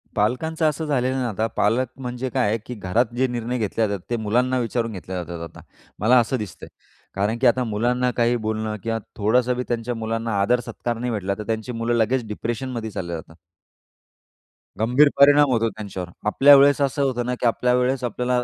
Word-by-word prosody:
पालकांचं 160 +10 0
असं 155 +2 -4
झालेलं 130 -3 0
आहे 130 - -1
ना, 120 - -1
आता 110 +1 -1
पालक 115 +5 +2
म्हणजे 125 0 -4
काय 105 - +1
आहे, 110 - +1
की 125 - -6
घरात 105 +4 +1
जे 130 - +2
निर्णय 120 0 -3
घेतल्या 110 0 0
जातात 100 -3 -5
ते 120 - 0
मुलांना 125 +4 +1
विचारून 115 -1 -1
घेतल्या 90 -1 -5
जातात 85 0 -7
आता, - - -14 0.4
मला 120 +5 +5
असं 125 +3 0
दिसतंय. 105 -6 -8 0.5
कारण 105 +4 0
की 130 - +5
आता 125 +2 +3
मुलांना 125 +3 0
काही 120 0 +3
बोलणं 110 -1 -3
किंवा 115 0 -1 0.2
थोडंसं 120 +4 +2
बी 125 - -1
त्यांच्या 120 +1 -2
मुलांना 115 -1 -2
आदर 120 +5 +3
सत्कार 120 0 -4
नाही 125 +1 -2
भेटला 100 -2 -2
तर 105 - -5
त्यांची 110 +2 -2
मुलं 115 0 -1
लगेच 115 +1 +1
डिप्रेशनमध्ये 115 +2 -4
चालल्या 85 -3 -4
जातात. 80 +1 -12 1.4
गंभीर 125 +7 +4
परिणाम 145 0 +7
होतो 115 -2 +2
त्यांच्यावर. 95 -5 -7 0.2
आपल्यावेळेस 140 +5 +6
असं 140 +1 0
होतं 125 -3 -1
ना 125 0 -1
की - - -2
आपल्यावेळेस 125 +2 +1
आपल्याला, 125 +1 0
120 Hz, 190 wpm, -23 LUFS, 110-125 Hz, 1.4 s, परिणाम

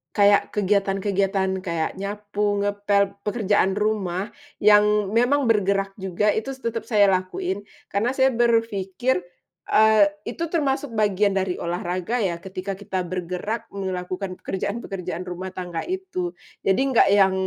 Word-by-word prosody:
kayak 205 0 +6
kegiatan-kegiatan, 195 -1 +1 0.2
kayak 170 -2 -1
nyapu, 205 0 -2
ngepel, 200 -1 +1
pekerjaan 205 -2 +1
rumah, 205 -2 -1 0.3
yang 210 -1 +4
memang 260 +5 +3
bergerak 200 -3 +2
juga 190 +2 +1
itu 245 +5 -2
tetep 230 -3 -4
saya 210 -3 +5
lakuin 185 +1 -2 0.3
karena 215 +5 +1
saya 265 0 +4
berpikir, 230 -2 +1 0.5
eee, 215 -1 +5 0.2
itu 245 +8 -4
termasuk 285 -4 0
bagian 205 -1 +2
dari 190 -2 0
olahraga 175 +4 -2
ya, 180 -3 0
ketika 190 +1 -6
kita 190 -2 -3
bergerak 185 +5 -4
melakukan 185 -1 -4
pekerjaan-pekerjaan 190 -3 -4
rumah 185 +1 -5
tangga 175 -3 -4
itu. 370 -1 -3 0.3
Jadi 190 - +2 0.2
nggak - - +6
yang 195 -2 +5
200 Hz, 125 wpm, -23 LUFS, 190-215 Hz, 0.5 s, kayak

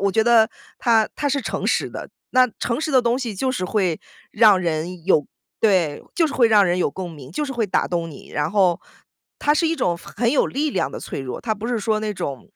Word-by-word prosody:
我 200 0 +2
觉 220 +2 +2
得 235 -1 +6
呃， - - -8 0.3
它 225 -2 +3
它 290 - -1
是 280 0 0
诚 - - -3
实 - - 0
的。 - - -7 0.2
那 255 0 +4
诚 235 +3 -1
实 315 0 -2
的 260 -3 +4
东 240 +1 +1
西 240 -5 -4
就 260 +7 -1
是 185 -8 -2
会 185 -6 0 0.3
让 210 -3 +5
人 170 0 -3
有 160 -6 +3 0.3
对， 180 -9 +2
就 330 - +3
是 295 - -5
会 235 -3 +4
让 210 -2 +5
人 175 -1 +1
有 180 - +1
共 180 +3 -6
鸣， 140 -4 -11
就 240 - -2
是 275 - -5
会 235 -4 -1
打 190 - +1
动 170 -2 -2
你。 145 - -13
然 150 - -1
后 185 -5 +2 0.6
它 295 - +2
是 325 +2 +2
一 330 - -1
种 175 - 0
很 235 +6 -2
有 285 - +3
力 295 +3 -1
量 - - -1
的 - - -7
脆 - - -6
弱， 130 -2 -6
它 220 -2 -1
不 215 +3 -6
是 245 -2 0
说 215 0 0
那 215 -1 -2
种 140 -8 -6
215 Hz, 270 characters per minute, -22 LUFS, 180-245 Hz, 0.6 s, 得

